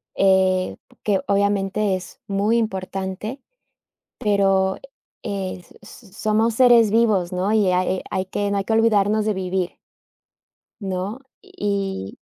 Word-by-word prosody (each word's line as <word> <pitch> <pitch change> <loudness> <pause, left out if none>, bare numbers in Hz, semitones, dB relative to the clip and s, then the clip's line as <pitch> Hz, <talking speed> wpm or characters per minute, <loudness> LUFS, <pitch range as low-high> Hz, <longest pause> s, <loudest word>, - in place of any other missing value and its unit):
eh, 190 -1 +2 0.3
que 200 -3 +1
obviamente 200 0 +1
es 185 - -9
muy 205 +4 +1
importante, 195 +3 -3 0.8
pero, 195 -2 +2 0.5
eh, 195 -2 -3
s 175 - -19
s 205 -1 -15
somos 215 +2 +1
seres 235 -4 +6
vivos, 215 -6 +2
¿no? 185 +3 0
Y 205 -4 +3
hay, 185 +1 +1
eh, - - -12
hay 190 - -1
que 205 +1 -2
no 200 - 0
hay 195 - 0
que 225 - 0
olvidarnos 215 -1 +3
de 215 - +1
vivir. 185 -1 -2 1.0
¿No? 190 +4 -3 0.2
Y 200 - -3
200 Hz, 130 wpm, -22 LUFS, 190-215 Hz, 1.0 s, seres